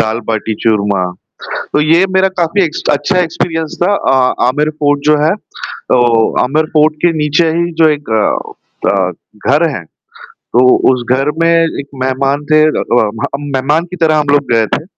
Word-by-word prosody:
दाल 110 0 0
बाटी 110 0 -2
चूरमा। 100 -4 +1 0.5
तो - - -2
ये 165 +4 +3
मेरा 190 0 +3
काफ़ी 175 +3 +1
एक्स 165 -4 -2
अच्छा 180 +6 0
एक्सपीरियंस 165 -2 -3
था। 190 +3 +2 0.2
अ, 130 -1 +3
आमिर 150 +4 0
फोर्ट 145 -1 +1
जो 150 - +4
है, 160 - +2
तो 205 -10 -4 0.4
आमिर 155 +5 0
फोर्ट 155 0 +3
के 175 - +4
नीचे 150 +3 +1
ही 170 +2 -1
जो 160 - +6
एक 145 - -13
अ - - -2 0.4
अ, 95 -2 0 0.4
घर 145 +4 +3
है, 140 - -5 0.5
तो 120 - -1 0.3
उस 125 -2 -2
घर 135 +2 0
में 165 - +3 0.3
एक 140 - -7 0.2
मेहमान 135 +2 -1
थे 155 0 +5
अ 155 - -1 0.2
अ, 110 - +1
हम 140 +1 -4
मेहमान 150 +6 0
की - - -5
तरह 155 -1 +3
हम 150 - -2
लोग 145 -3 +1
गए 115 -1 +3
थे। - - -5
150 Hz, 180 wpm, -13 LUFS, 130-160 Hz, 0.5 s, जो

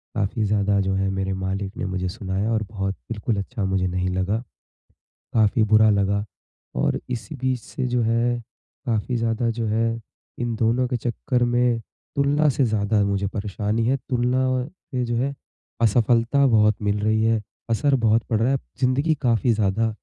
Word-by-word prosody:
काफ़ी 110 +1 0
ज़्यादा 100 -1 +2
जो 95 0 0
है 95 0 0
मेरे 95 0 -1
मालिक 95 +2 -3
ने - - -2
मुझे 95 -1 -2
सुनाया 100 +1 -2
और 110 -1 +1
बहुत 95 -2 -3 0.2
बिल्कुल 110 0 -1
अच्छा 100 +1 -3
मुझे 95 -1 +1
नहीं 90 +1 -1
लगा, 95 +4 0 1.0
काफ़ी 110 0 +3
बुरा 110 0 +7
लगा। 100 0 +1 0.5
और - - +1
इसी 115 +2 -4
बीच 130 -1 -1
से 130 +3 -4
जो 120 -1 +1
है 115 +2 +1 0.5
काफ़ी 115 +2 0
ज़्यादा 115 0 0
जो 115 0 -2
है 115 +1 0 0.4
इन 120 -1 -1
दोनों 120 +3 +2
के 125 - -1
चक्कर 120 +2 -1
में 120 -1 +2 0.4
तुलना 145 +2 +3
से 135 0 +2
ज़्यादा 105 -1 +1
मुझे 100 0 0
परेशानी 105 +2 -2
है, 135 +2 +3
तुलना 125 0 0
और 130 +3 -1 0.2
ये 125 -1 0
जो 120 0 -1
है 140 +3 0 0.5
असफलता 120 +4 +3
बहुत 110 -3 +4
मिल 105 0 +1
रही 110 +1 +2
है, 115 -1 +2 0.3
असर 135 +5 +2
बहुत 110 +1 +4
पड़ 110 -3 0
रहा 125 +4 +2
है। 135 - +2 0.2
ज़िंदगी 140 +5 +2
काफ़ी 120 -1 +3
ज़्यादा 110 +2 +1
115 Hz, 175 wpm, -23 LUFS, 100-120 Hz, 1.0 s, बुरा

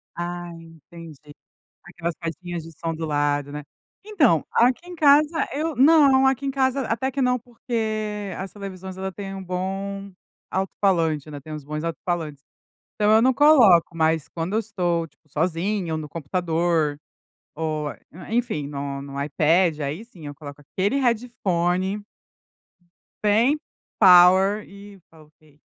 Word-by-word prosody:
Ai, 175 0 -5
entendi. 165 -1 -13 0.7
Aquelas 170 -1 -5
caixinhas 170 +1 -5
de 165 - -11
som 165 +1 -4
do 160 0 -4
lado, 145 -1 0
né. 150 0 -6 0.4
Então, 295 - +2
aqui 250 +9 +2
em 360 - -8
casa 305 0 +4
eu 310 +3 -2
não, 275 -2 +6
aqui 265 +1 +1
em - - 0
casa 265 0 +1
até 260 +4 -1
que 270 +1 -3
não, 250 -1 +2
porque 215 -4 -4
as 190 0 -6
televisões 190 -2 -8
ela 190 0 -4
tem 195 0 -7
um 190 - -6
bom 195 +2 -4 0.4
alto 190 0 -2
falante, 165 -6 +1
né, 145 -1 -8
tem 155 +3 -10
uns 150 -2 -7
bons 150 +1 -5
alto 165 -1 -3
falantes. 155 -6 -3 0.5
Então 210 -1 +2
eu 220 - +6
não 260 +1 +4
coloco, 235 - +5
mas 160 -1 +1
quando 170 +4 -4
eu - - +3
estou, 175 -6 -1
tipo, 150 - -36
sozinha 170 +4 -1
ou 155 - -2
no 150 - -6
computador 165 -1 -1 0.6
ou, 155 -1 -2
eh, - - -14 0.3
enfim, 230 - -1
no 140 -1 -5
no 140 0 -6
iPad, 155 +3 +2
aí 150 +10 -4
sim 180 -10 -14
eu 145 - -6
coloco 145 -1 -11
aquele 195 - -1
headphone 195 -5 0 1.2
bem 230 +8 +3 0.4
power 190 +2 +6
e 200 0 -13
tá, 160 -1 -18
ok. 150 -1 -25
180 Hz, 155 wpm, -23 LUFS, 160-220 Hz, 1.2 s, não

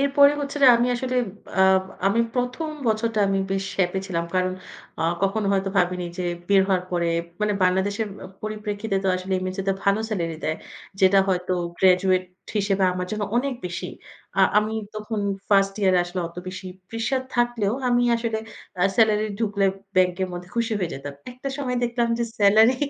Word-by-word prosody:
এরপরে 280 +1 +5
হচ্ছে 280 0 -4
যে - - +9
আমি 240 +1 +2
আসলে 255 +1 -2 0.4
আ - - +6 0.4
আমি 210 +4 +3
১ম 250 +5 -1 0.2
বছরটা 220 0 +1
আমি 195 - +1
বেশ 195 0 -1
হ্যাপি 185 +1 +1
ছিলাম। 170 -3 -2
কারণ 185 0 +1 0.5
আ - - +1 0.2
কখনো 200 +1 +1
হয়তো 195 0 0
ভাবিনি 180 0 +1
যে - - -1 0.3
বের 200 -1 +6
হওয়ার 185 -2 +2
পরে 175 -1 0 0.3
মানে 210 0 +2
বাংলাদেশের 195 +4 +1 0.2
আ - - -6 0.2
পরিপ্রেক্ষিতে 210 -1 -3
তো - - +2
আসলে 185 +1 -5
MSA 185 +1 -3
তে - - +4
ভালো 200 +2 +3
স্যালারি 170 -7 -2
দেয়। 155 +1 0 0.4
যেটা 190 +1 +6
হয়তো 180 0 0 0.3
গ্র্যাজুয়েট 185 0 +4 0.3
হিসেবে 200 -1 +2
আমার 180 0 -3
জন্য 215 -1 -2
অনেক 265 +2 0
বেশি। 180 +1 -5 0.5
আ - - +6 0.2
আমি 215 +1 -1 0.2
তখন 215 0 -3 0.3
ফার্স্ট 195 -1 +4
ইয়ার 190 -2 +4
এ - - +5
আসলে 175 +1 -4
অত 170 - -19
বেশি 185 0 -7 0.2
প্রেশার 230 +4 -1
থাকলেও 240 -4 +1
আমি 245 0 +3
আসলে 230 -1 -2 0.4
আ - - +5
স্যালারি 215 -1 +4
ঢুকলে 205 -3 +1 0.3
ব্যাংকের 185 0 +2
মধ্যে 175 0 -7
খুশি 230 -1 0
হয়ে 180 -4 -2
যেতাম। 140 +1 -7 0.2
একটা 255 +2 -6
সময় 255 -3 -2
দেখলাম 235 0 0
যে 235 - +1
স্যালারি 220 +5 +6
200 Hz, 175 wpm, -24 LUFS, 185-230 Hz, 0.5 s, যে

